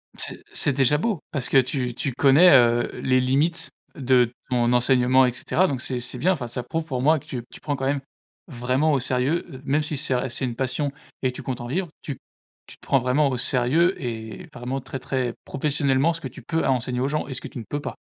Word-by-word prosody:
C'est - - -6
c'est 140 - +3
déjà 135 +2 +3
beau! 205 +2 -1
Parce 140 -5 -1
que - - +4
tu 130 -1 +1
tu 130 +2 -3
connais, 145 +8 +6
heu, 120 -1 +4
les 130 0 +3
limites 140 +7 +1 0.3
de 125 -4 +3 0.2
ton 120 -1 +2
enseignement, 125 +1 +4
et 125 - 0
cetera, 185 +8 +1
donc 135 -6 -3
c'est 130 -1 -1
c'est 120 - -2
bien. 185 +2 +2
Enfin, 135 -8 -5
ça 120 +1 -4
prouve 160 +6 -3
pour 130 -6 -3
moi 155 +4 +4
que - - -20
tu 125 -3 -5
tu - - -11
prends 145 - -2
quand 135 -1 -3
même 140 +1 0 0.5
vraiment 130 +2 0
au 140 - +2
sérieux. 130 +6 0
Heu, 130 - -10
même 145 +3 +1
si 150 0 -3
c'est, 135 -1 0
heu 125 +1 0
c'est 120 +2 -2
une 120 -2 -4
passion 135 +3 -1 0.3
et 130 - +1
que - - -16
tu - - -7
comptes 130 -2 -4
en 120 - -6
vivre, 175 +7 -2
tu 140 -5 -5 0.5
tu - - -10
te - - -65
prends 135 - +3
vraiment 130 +4 +2
au 130 - -2
sérieux, 135 +9 +3
et 115 +6 -6
vraiment 125 +2 -4
très 135 0 -6
très 130 -2 -2
professionnellement, 140 +1 +1
ce 165 - -8
que 135 - -4
tu 130 +1 -11
peux 160 +7 -1
à - - +3
enseigner 125 0 -1
aux 130 - +1
gens 150 +2 -2
et 135 - -5
ce 125 - -6
que - - -7
tu - - -8
ne - - -6
peux 145 - -2
pas. - - -6
130 Hz, 250 wpm, -24 LUFS, 125-145 Hz, 0.5 s, connais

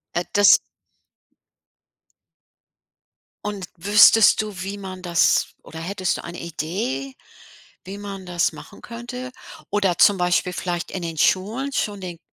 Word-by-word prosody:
Äh, 175 - +1
das 205 0 +7 2.9
Und 205 -3 -4
wüsstest 210 +4 +6
du 205 -5 -6
wie 200 +1 -5
man 185 -2 -8
das 170 -2 +2
oder 160 - -12
hättest 185 +2 -2
du - - -9
eine 170 0 -8
Idee, 155 -5 -4 0.7
wie 195 +2 -7
man 200 -2 -8
das 175 -1 +1
machen - - -13
könnte? 250 +2 -7 0.4
Oder 195 -4 +1
zum 205 - +5
Beispiel 180 +1 +1
vielleicht 175 -1 -4
in 190 - -4
den 165 -2 -5
Schulen 220 - +1
schon 205 -5 -2
den 175 -3 -7
190 Hz, 130 wpm, -22 LUFS, 175-205 Hz, 2.9 s, das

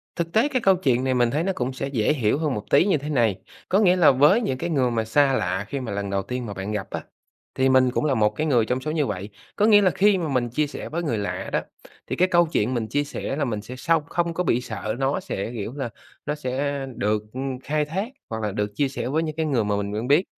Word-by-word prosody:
Thực 170 -1 -3
tế 225 +6 +4
cái 260 -4 -1
câu 195 -3 +5
chuyện 130 -8 +1
này 130 0 +1
mình 120 -2 +2
thấy 150 +5 0
nó 195 - 0
cũng 125 +1 -2
sẽ 130 - -4
dễ 130 -1 +1
hiểu 120 -4 +1
hơn 155 -4 0
một 105 - -4
tí - - +5
như 195 -6 +3
thế 145 +1 -6
này, 115 -9 +1 0.3
có 195 - +4
nghĩa 185 -4 +5
là 170 -6 +6
với 150 - +5
những 130 - -1
cái 170 +5 -3
người 130 -6 +1
mà 115 -1 0
xa 135 +4 +3
lạ 95 -4 -1
khi 140 - -3
mà 125 -5 -5
lần 100 0 -3
đầu 100 0 0
tiên 125 +2 -4
mà 105 - -5
bạn 95 +2 -5
gặp 105 -3 -3
á, - - -4 0.5
thì 130 0 +2
mình 130 -1 +4
cũng 140 - -1
là 145 - +2
một 105 -1 +3
cái 155 - -1
người 120 -6 +3
trong 125 +3 -1
số 155 - -3
như 155 -2 +1
vậy, 100 -3 -4 0.3
có 210 - +3
nghĩa 210 -2 +7
là 190 - +4
khi 205 +2 +3
mà 170 -3 -2
mình 125 -4 0
chia 150 +6 0
sẻ 145 - -7
với 170 +2 -3
người 120 -9 -1
lạ 100 -1 -3
đó - - +2 0.5
thì - - -2
cái 185 - +3
câu 175 -1 +4
chuyện 130 -7 0
mình 115 -3 -1
chia 145 +6 0
sẻ 140 -1 -4
là 140 -1 0
mình 110 -5 -3
sẽ 120 +4 -9
sông 165 +4 +1
không 170 +1 -1
có 180 - -1
bị 125 -7 +1
sợ 110 -3 -4
nó 135 +5 +1
sẽ, 115 - -4
kiểu 110 +2 -4
là, 135 -4 -3 0.4
nó 150 - -1
sẽ 140 0 -2
được, 105 0 0
ưm, 130 0 -4
khai 150 +3 -1
thác 190 +8 -3 0.2
hoặc 110 0 -4
là 105 - -1
được 105 +1 -2
chia 140 +5 +2
sẻ 135 - -4
với 155 +5 0
những 155 -2 -4
cái 160 0 -1
người 135 -7 +1
mà 105 0 0
mình 100 0 -3
quen 110 +4 -3
biết, 145 +6 +5
135 Hz, 290 wpm, -24 LUFS, 115-155 Hz, 0.5 s, nghĩa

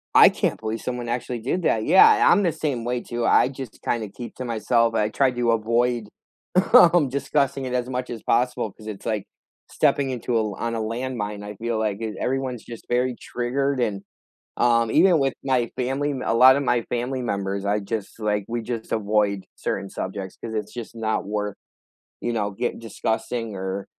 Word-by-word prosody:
I - - +9
can't - - -1
believe 110 0 -3
someone 125 -1 -4
actually 120 0 -3
did 135 +11 -2
that, 110 -7 +1
yeah, 190 - +7
I'm 200 - +4
the 175 - +2
same 140 -7 -2
way 125 0 -1
too, 120 0 -3
I - - +5
just 130 -3 -8
kinda 110 -3 -2
keep 120 +4 -9
to 130 - -5
myself, 115 0 +1
I 105 -1 +1
try 130 +4 +2
to 120 -1 +1
avoid, 115 +1 +1 0.7
um, 175 - +7
discussing 140 0 0
it 125 - -4
as 125 0 -1
much 125 0 -3
as 115 -3 -6
possible 120 -3 +1
'cause 110 - -14
it's, 105 -3 -7
like 110 -3 -1 0.5
stepping 135 -2 +2
into 125 -1 -2
a - - +3
l 105 -2 -2
on 115 0 -2
a - - -2
landmine, 110 -2 -3
I 105 0 -7
feel 115 +2 -2
like 105 -2 -1
th 110 -2 -4
everyone's 130 -2 -2
just 115 -1 -10
very 125 +1 +1
triggered, 135 +3 -1
and, 105 -5 -1 0.5
um, 115 -2 +3
even 180 +3 +5
with 135 -2 +1
my 125 -4 +1
family 135 +3 -1
m 130 -2 -4
a - - +1
lotta 130 +3 +7
my 120 -4 +1
family 125 +2 -2
members, 100 -3 -2
I 105 +1 +1
just, 105 +1 -5
like 105 -2 0
we 120 0 -2
just 115 -1 -5
avoid 105 -2 +1
certain 100 - -3
subjects 95 0 -5
'cause 115 -1 -5
it's 105 -2 -3
just 120 -1 -7
not 110 -2 -1
worth, 105 -1 -3 0.7
you 120 - -1
know, 105 -3 -1
get 120 +5 -3
discussing 115 0 -3
or, 95 +1 -4
115 Hz, 195 wpm, -24 LUFS, 110-125 Hz, 0.7 s, I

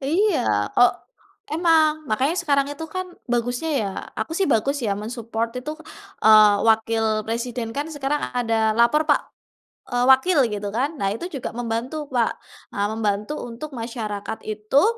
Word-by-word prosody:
Iya 340 +7 +2 0.3
kok 245 0 +5 0.6
emang 310 -2 +3
makanya 260 +8 +1
sekarang 280 -5 +2
itu 305 +3 -7
kan 370 0 -2 0.3
bagusnya 245 +6 -1
ya, 205 - -1 0.3
aku 325 - -3
sih 375 +3 0
bagus 275 +3 +2
ya 200 -1 0
men-support 230 +1 -4
itu, 255 +4 -5 0.5
eee, 215 -1 +8
wakil 225 0 +2 0.2
presiden 235 0 -3
kan 290 - -1
sekarang 290 0 -1
ada 225 -3 +1
lapor 270 +7 +4
pak, 295 - +3 0.7
eee, 245 -1 0
wakil 290 +6 +4
gitu 205 0 -3
kan. 270 +4 +1
Nah 195 - 0
itu 340 - -6
juga 275 -4 -4
membantu, 245 +6 -3
Pak, 240 -3 +2 0.4
eee, 200 0 +1
membantu 210 +2 -1 0.2
untuk 255 +7 -8
masyarakat 225 -3 -5
itu, 215 +6 +1
245 Hz, 150 wpm, -23 LUFS, 225-295 Hz, 0.7 s, eee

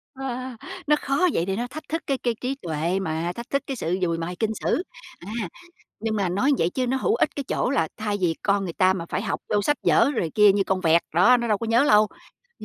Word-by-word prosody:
Ờ, 265 -2 -4 0.5
nó 300 - +4
khó 280 +6 +2
vậy 165 - 0
để 195 0 -1
nó 240 +3 -2
thách 310 +3 -9
thức 325 +1 -2
cái 275 -2 0
cái 240 -2 -1
trí 255 +2 -2
tuệ 170 - -2
mà, 165 -1 -2
thách 235 +5 -8
thức 275 - +1
cái 270 - -4
sự 180 -3 -1
dùi 170 -2 0
mài 175 +2 -4
kinh 220 +2 0
sử. 325 - 0 0.4
À, 175 - -12 0.7
nhưng 220 0 -2
mà 200 -4 0
nói 205 +11 +2
vậy 165 - +2
chứ 255 +6 -2
nó 265 - +1
hữu 430 - +1
ích - - 0
cái 280 - -3
chỗ - - 0
là 245 - +1
thay 210 -1 -2
vì 165 -3 +1
con 200 -1 +1
người 170 -3 -4
ta 185 0 +3
mà 175 -3 -4
phải - - -1
học 215 - -2
vô 205 - +3
sách 295 +8 +1
vở 285 - +4
rồi 165 -8 -1
kia 210 -1 +7
như 200 0 +1
con 190 -1 -1
vẹt, 165 -1 +4
đó, 235 +10 +6
nó 235 - -2
đâu 210 -2 +2
có 230 - -4
nhớ 230 +4 +4
lâu, 215 -6 +5 0.5
nh - - -9
210 Hz, 265 wpm, -24 LUFS, 180-255 Hz, 0.7 s, kia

